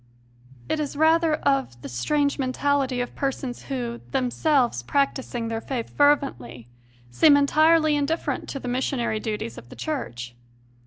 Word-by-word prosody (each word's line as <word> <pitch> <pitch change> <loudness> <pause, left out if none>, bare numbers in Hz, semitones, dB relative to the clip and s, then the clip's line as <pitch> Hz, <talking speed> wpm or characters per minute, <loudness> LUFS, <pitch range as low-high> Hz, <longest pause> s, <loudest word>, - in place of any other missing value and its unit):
It - - -1
is 295 -1 -3
rather 320 +1 +3
of 275 - 0
the - - -5
strange 280 - 0
mentality 265 -1 0
of 245 - -5
persons 270 -2 -4
who, 240 -3 -4
themselves 260 - +1
practising 255 - -1
their 225 0 -3
faith 245 -3 -4
fervently, 125 - +1 0.4
seem 285 - +6
entirely 310 +2 +4
indifferent 290 +3 -2
to 275 - -4
the 250 - -7
missionary 245 -3 -1
duties 210 - -4
of 120 - -17
the - - -11
Church. 120 - -5
270 Hz, 140 wpm, -24 LUFS, 230-290 Hz, 0.4 s, seem